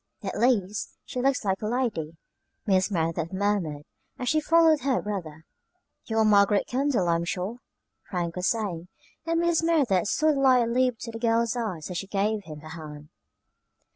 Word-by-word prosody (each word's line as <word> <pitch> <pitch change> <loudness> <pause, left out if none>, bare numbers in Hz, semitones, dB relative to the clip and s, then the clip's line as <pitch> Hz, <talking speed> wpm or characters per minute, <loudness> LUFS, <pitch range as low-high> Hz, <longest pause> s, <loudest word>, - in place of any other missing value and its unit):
"At - - -4
least 210 -5 0
she 250 - -4
looks 270 -3 +1
like 190 -1 0
a 210 - -2
lady," 215 -10 -2 0.5
Mrs. 190 -1 +3
Merideth 165 -3 -1
murmured, 190 -7 -1 0.3
as 250 - -2
she 310 - +3
followed 325 0 +4
her 265 -1 +1
brother. 165 -7 -6 0.6
"You 225 - -3
are 220 - +4
Margaret 205 -1 +4
Kendall, 260 -7 0
I 170 0 +3
am 170 - -3
sure," 185 +6 -3 0.5
Frank 175 -3 -2
was 180 0 -1
saying; 190 -7 -2 0.4
and 330 0 +1
Mrs. 340 -1 +2
Merideth 275 - +2
saw 310 +8 +2
the 285 - -1
light 255 -3 +4
leap 250 0 +1
to 230 - -5
the 225 - -7
girl's 230 0 +1
eyes 190 -9 -4
as 175 - -2
she 195 - -6
gave 205 +1 -1
him 155 -2 -9
her 155 - -11
hand. 150 -2 -9
210 Hz, 180 wpm, -26 LUFS, 175-250 Hz, 0.6 s, followed